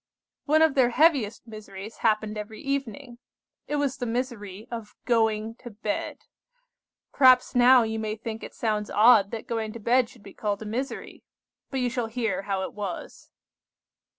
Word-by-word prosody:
"One 310 +2 +4
of 320 -3 +4
their 260 -3 +4
heaviest 250 -7 +2
miseries 215 -2 -9
happened 215 -1 +1
every 210 +1 -7
evening. 275 -3 -4 0.5
It 295 - -2
was 285 -2 0
the 245 - -3
misery 225 -4 -4
of 230 -3 -7
going 220 -2 +1
to 240 - -9
bed. 210 -1 -4 0.9
Perhaps 255 -2 +5
now 250 0 +6
you 220 0 -3
may 215 -1 -3
think 220 0 -6
it - - -9
sounds 215 -2 -1
odd 215 -2 +6
that 225 0 -6
going 225 -2 -3
to 230 - -8
bed 235 +2 +2
should 230 - -18
be 200 - -12
called 205 0 -3
a - - -9
misery. 250 +6 -5 0.5
But 265 -2 -2
you 250 - +1
shall 235 -1 -2
hear 225 -3 -2
how 195 -1 -2
it - - -5
was. 200 -4 -7
225 Hz, 170 wpm, -26 LUFS, 215-250 Hz, 0.9 s, now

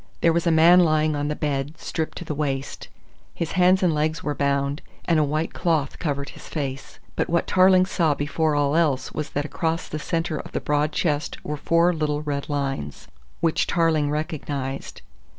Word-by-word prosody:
There 165 - +4
was 170 +1 0
a - - +4
man 165 +3 +7
lying 155 -3 +3
on 145 0 -1
the 150 - -2
bed, 145 +1 -2
stripped 160 -1 -4
to 175 - -7
the 155 - -3
waist. 140 -2 -3 0.5
His 170 - -3
hands 185 +1 +4
and 175 - +4
his - - -1
legs 155 +4 -1
were 150 - -1
bound 140 0 0 0.2
and 165 -2 +3
a - - +4
white 155 +3 -1
cloth 160 -6 0
covered 140 -3 -2
his - - -12
face. 135 -3 -5 0.2
But - - -1
what 170 0 +1
Tarling 185 0 +5
saw 165 -6 +1
before 150 +2 0
all 145 0 +1
else 150 -6 +1
was 150 -1 -4
that 145 +1 -2
across 165 +2 -2
the 155 - -5
centre 165 0 -2
of - - -9
the - - 0
broad 150 +1 0
chest 150 -2 -1
were 150 - -2
four 170 +4 +2
little 150 -2 -1
red 145 -1 -3
lines, 135 - -3 0.3
which 165 -2 +1
Tarling 160 -4 +2
recognised. 145 -3 -4
155 Hz, 195 wpm, -24 LUFS, 145-165 Hz, 0.5 s, man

